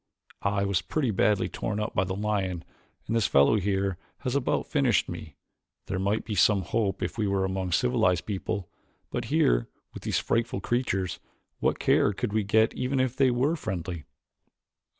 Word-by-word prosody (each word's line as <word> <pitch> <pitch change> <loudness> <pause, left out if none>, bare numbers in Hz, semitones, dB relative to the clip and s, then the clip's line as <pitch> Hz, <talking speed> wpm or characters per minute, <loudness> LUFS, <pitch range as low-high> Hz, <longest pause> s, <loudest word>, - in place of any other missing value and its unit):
I 100 0 +1
was 100 -4 +1
pretty 140 -7 -1
badly 100 +1 +2
torn 105 -1 -3
up 105 +1 -2
by 90 - +1
the 95 +1 -3
lion 100 -4 -1 0.4
and 115 - -2
this 115 - +3
fellow 70 +10 +5
here 95 -2 -1 0.2
has 125 +1 -2
about 140 +1 0
finished 135 -7 +2
me. 80 -5 -8 0.5
There 95 -1 -3
might 100 +3 0
be 110 - -4
some 100 0 +4
hope 100 +3 -1
if - - -4
we 105 - +1
were 95 -1 +1
among 95 -1 -2
civilized 110 -4 +2
people, 100 -1 -3 0.4
but - - -2
here - - +2 0.3
with - - -8
these - - -1
frightful 115 0 0
creatures 95 -7 -1 0.4
what - - +1
care 105 - +3
could 100 - -3
we 110 -1 +2
get 110 +3 +3
even 130 +1 -1
if 130 -1 +1
they 135 -1 +4
were 130 +6 +1
friendly?" 85 - -4
100 Hz, 175 wpm, -27 LUFS, 95-115 Hz, 0.5 s, fellow